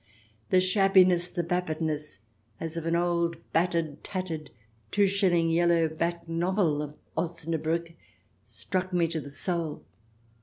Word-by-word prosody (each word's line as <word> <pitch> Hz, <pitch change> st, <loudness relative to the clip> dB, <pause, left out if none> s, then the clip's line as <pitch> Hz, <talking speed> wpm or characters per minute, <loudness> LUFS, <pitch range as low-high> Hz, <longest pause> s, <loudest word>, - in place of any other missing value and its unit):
The 185 Hz, -, +5 dB
shabbiness, 185 Hz, -2 st, +4 dB
the 175 Hz, -, -2 dB
vapidness, 155 Hz, -, -2 dB, 0.4 s
as 165 Hz, 0 st, -4 dB
of 165 Hz, -1 st, -3 dB
an 165 Hz, -, +2 dB
old, 170 Hz, -1 st, +1 dB, 0.2 s
bat 175 Hz, +2 st, +2 dB
tered, 160 Hz, -4 st, -1 dB
tattered, 165 Hz, -6 st, -4 dB, 0.4 s
two 205 Hz, -1 st, +3 dB
shilling, 185 Hz, -4 st, +2 dB
yellow 170 Hz, -1 st, +3 dB
back 170 Hz, +2 st, -2 dB
novel, 165 Hz, -2 st, +1 dB
of 150 Hz, 0 st, -7 dB, 0.2 s
OsnabrUck 165 Hz, 0 st, -2 dB, 0.5 s
struck 185 Hz, -, -3 dB
me 170 Hz, -2 st, +3 dB
to 165 Hz, -1 st, -2 dB
the 145 Hz, -, -9 dB
soul. 165 Hz, +1 st, -2 dB
170 Hz, 130 wpm, -28 LUFS, 160-180 Hz, 0.5 s, The